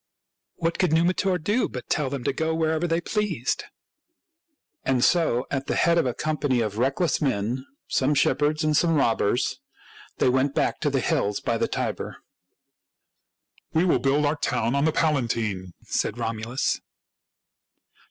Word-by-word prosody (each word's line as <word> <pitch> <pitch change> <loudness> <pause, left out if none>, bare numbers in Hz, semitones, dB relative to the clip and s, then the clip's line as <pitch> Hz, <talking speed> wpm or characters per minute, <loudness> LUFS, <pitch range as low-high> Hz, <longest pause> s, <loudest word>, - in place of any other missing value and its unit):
What 170 0 -2
could 180 -4 +2
Numitor 180 +3 +2
do 205 +9 0
but 125 - -7
tell 150 -4 0
them 135 -2 -4
to - - 0
go 160 +3 -1
wherever 160 +1 0
they 165 +1 0
pleased? 180 - -1 1.2
And 130 -2 +1
so, 155 -8 +3
at 135 -1 -2
the - - 0
head 170 0 +3
of 130 - +1
a 125 - -2
company 150 -4 0
of 110 -2 -2
reckless 135 +9 +1
men, 125 -1 -1
— - - -53
some 140 +3 +1
shepherds 150 +3 +2
and 155 -1 +2
some 165 +1 +3
robbers, 120 - +1 0.3
— 430 -1 -21
they - - +2
went 130 +2 +2
back - - 0
to 150 - +1
the 135 -2 0
hills 105 -3 0
by - - -1
the - - +1
Tiber. - - -3 0.8
" - - -41
We 165 +3 +4
will 180 - +3
build 140 +2 +2
our 145 +2 +1
town 115 -3 0
on 140 +1 +2
the 160 - +3
Palatine," 115 - 0
said 110 - -1
Romulus. 115 +2 -2
145 Hz, 165 wpm, -25 LUFS, 125-165 Hz, 1.2 s, We